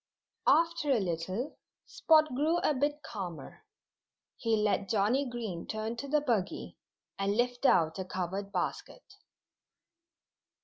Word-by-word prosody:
After 335 -2 +3
a 250 - +4
little 185 - -3 0.3
Spot 310 -3 +3
grew 305 +6 +2
a 305 - +2
bit 290 +2 -1
calmer. 180 - -7 0.7
He 225 -1 +1
let 205 -2 +1
Johnnie 230 +6 +2
Green 220 -8 -5
turn 220 +1 -3
to 280 - -5
the 300 +1 +2
buggy 230 -10 -1 0.4
and 200 +1 0
lift 245 +2 +1
out 160 0 +3
a - - -1
covered 190 +2 -4
basket. 185 - -4
225 Hz, 125 wpm, -31 LUFS, 190-285 Hz, 0.7 s, a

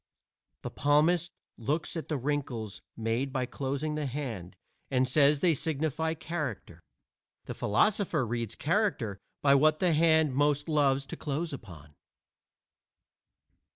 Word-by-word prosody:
The - - -4
palmist 155 +4 +2 0.3
looks 150 +10 -2
at 165 - -4
the 150 - -1
wrinkles 130 -7 -3 0.2
made 115 +4 -1
by 130 -1 -1
closing 140 +4 -3
the 150 -1 -2
hand 115 -10 -5 0.3
and 130 -1 +2
says 140 +2 +4
they 175 -3 +4
signify 160 +2 -1
character. 145 - -5 0.6
The - - -5
philosopher 170 - +1
reads 115 -1 -3
character 150 - 0 0.2
by 140 -1 +6
what 155 +3 +4
the 180 -3 +3
hand 160 -2 +4
most 145 +1 +1
loves 140 -3 +2
to - - -6
close 155 +2 -3
upon. 80 - -10
145 Hz, 125 wpm, -29 LUFS, 125-155 Hz, 0.6 s, by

